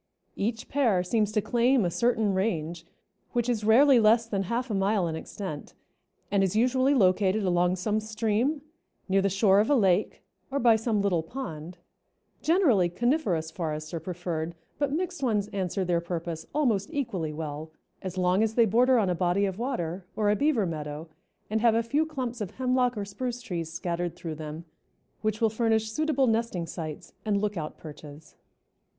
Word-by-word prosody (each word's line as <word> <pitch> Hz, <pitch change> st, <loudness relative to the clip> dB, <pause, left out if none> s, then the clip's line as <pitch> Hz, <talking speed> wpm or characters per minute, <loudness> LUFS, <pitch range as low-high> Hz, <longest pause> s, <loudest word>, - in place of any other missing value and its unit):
Each 225 Hz, +3 st, -2 dB
pair 235 Hz, -11 st, +2 dB
seems 210 Hz, +2 st, +1 dB
to 210 Hz, -2 st, +1 dB
claim 240 Hz, +1 st, +3 dB
a 175 Hz, -, 0 dB
certain 225 Hz, -1 st, +1 dB
range, 170 Hz, -4 st, -2 dB, 0.5 s
which 240 Hz, -1 st, 0 dB
is 230 Hz, -4 st, 0 dB
rarely 250 Hz, +4 st, +6 dB
less 225 Hz, +1 st, +4 dB
than 205 Hz, -4 st, -2 dB
half 240 Hz, +1 st, -1 dB
a -, -, -1 dB
mile 195 Hz, -1 st, +1 dB
in 160 Hz, -, -3 dB
extent, 160 Hz, -2 st, -7 dB, 0.6 s
and 200 Hz, -1 st, +3 dB
is 190 Hz, +1 st, 0 dB
usually 255 Hz, +4 st, +3 dB
located 195 Hz, -1 st, +3 dB
along 180 Hz, -1 st, +2 dB
some 210 Hz, +4 st, 0 dB
stream, 220 Hz, +6 st, -1 dB, 0.4 s
near 195 Hz, 0 st, +3 dB
the 195 Hz, -, +2 dB
shore 195 Hz, 0 st, +4 dB
of 215 Hz, -, +2 dB
a 290 Hz, -, +5 dB
lake, 195 Hz, -4 st, +2 dB, 0.3 s
or 275 Hz, -, -2 dB
by 235 Hz, -4 st, +5 dB
some 220 Hz, -2 st, 0 dB
little 180 Hz, -5 st, +2 dB
pond; 165 Hz, -, -7 dB, 0.6 s
generally 285 Hz, -, +3 dB
coniferous 185 Hz, -, 0 dB
forests 155 Hz, -2 st, -4 dB
are 165 Hz, -, -2 dB
preferred, 170 Hz, -1 st, -4 dB, 0.2 s
but 285 Hz, -2 st, 0 dB
mixed 350 Hz, +1 st, -2 dB
ones 210 Hz, -6 st, 0 dB
answer 190 Hz, -1 st, -2 dB
their 175 Hz, -1 st, +1 dB
purpose 170 Hz, -1 st, -5 dB
almost 230 Hz, -10 st, +1 dB
equally 200 Hz, -, -2 dB
well 150 Hz, 0 st, -5 dB, 0.3 s
as 185 Hz, -1 st, -6 dB
long 180 Hz, +2 st, +2 dB
as 220 Hz, 0 st, 0 dB
they 235 Hz, -, +5 dB
border 245 Hz, +5 st, +4 dB
on 210 Hz, -4 st, +2 dB
a 180 Hz, -, +1 dB
body 180 Hz, +3 st, +1 dB
of 190 Hz, +1 st, -4 dB
water 185 Hz, -8 st, -3 dB
or 210 Hz, -1 st, +2 dB
a -, -, +3 dB
beaver 275 Hz, -5 st, +2 dB
meadow 155 Hz, -1 st, -5 dB, 0.4 s
and 220 Hz, +1 st, -1 dB
have 230 Hz, -1 st, +4 dB
a 230 Hz, -, +2 dB
few 290 Hz, +7 st, 0 dB
clumps 255 Hz, -6 st, -4 dB
of 200 Hz, -, -3 dB
hemlock 250 Hz, -2 st, +1 dB
or 205 Hz, -, -2 dB
spruce 240 Hz, +5 st, -4 dB
trees 175 Hz, -9 st, -5 dB
scattered 175 Hz, 0 st, -3 dB
through 165 Hz, -2 st, -6 dB
them 155 Hz, +1 st, -7 dB, 0.6 s
which 215 Hz, 0 st, -1 dB
will 225 Hz, -, +3 dB
furnish 220 Hz, -1 st, +1 dB
suitable 305 Hz, 0 st, +1 dB
nesting 225 Hz, -7 st, 0 dB
sites 160 Hz, -2 st, -7 dB
and 205 Hz, -2 st, +1 dB
lookout 200 Hz, -7 st, -3 dB
perches. 150 Hz, 0 st, -12 dB
205 Hz, 180 wpm, -27 LUFS, 175-235 Hz, 0.6 s, rarely